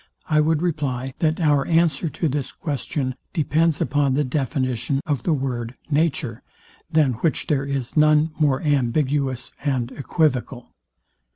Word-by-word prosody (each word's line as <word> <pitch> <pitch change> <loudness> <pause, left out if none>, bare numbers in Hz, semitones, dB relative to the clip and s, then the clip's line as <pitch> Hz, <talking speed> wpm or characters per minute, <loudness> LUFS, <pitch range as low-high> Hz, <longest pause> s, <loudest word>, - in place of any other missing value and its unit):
I 150 -1 +3
would 160 +1 +1
reply, 135 -6 -2
that 160 0 +1
our 145 -4 +3
answer 165 -1 +2
to 160 - -1
this 140 -2 -2
question 140 -2 -3 0.2
depends 160 -1 +1
upon 140 -2 +1
the 150 - +2
definition 130 -1 -1
of 145 -5 -1
the 170 - 0
word, 130 -4 -2 0.2
Nature, 145 -6 0 0.5
than 155 -5 +3
which 165 - +1
there 140 -2 0
is 135 -3 -3
none 155 +1 +4
more 145 -2 +2
ambiguous 135 -1 0
and 130 -4 -1
equivocal. 130 -4 -1
145 Hz, 135 wpm, -23 LUFS, 130-155 Hz, 0.5 s, none